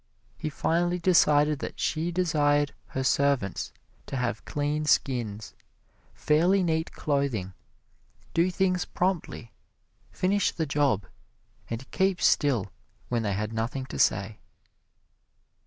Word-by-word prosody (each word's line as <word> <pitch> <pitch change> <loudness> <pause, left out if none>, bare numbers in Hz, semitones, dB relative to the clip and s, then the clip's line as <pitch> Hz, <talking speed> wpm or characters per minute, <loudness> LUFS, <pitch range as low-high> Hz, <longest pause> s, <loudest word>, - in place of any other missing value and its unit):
He 155 - -4
finally 175 +4 0
decided 150 -4 +4
that - - -6
she 165 +1 -1
desired 145 -5 +2
her 130 - -3
servants 135 -8 +1 0.4
to 135 - -4
have 120 -3 -2
clean 150 +1 -1
skins, 115 -8 0 0.6
fairly 175 +6 +3
neat 160 -1 0
clothing, 140 -10 -1 0.8
do 170 +2 +3
things 185 0 +1
promptly, 175 -10 -2 0.6
finish 195 +2 +1
the 160 - -1
job 135 -8 +1 0.6
and 115 +3 -6
keep 190 -2 +1
still 125 - +2 0.4
when 120 -1 0
they 105 -3 -1
had 105 +3 -3
nothing 115 +4 -2
to - - -7
say. 105 +1 +1
145 Hz, 115 wpm, -27 LUFS, 120-170 Hz, 0.8 s, decided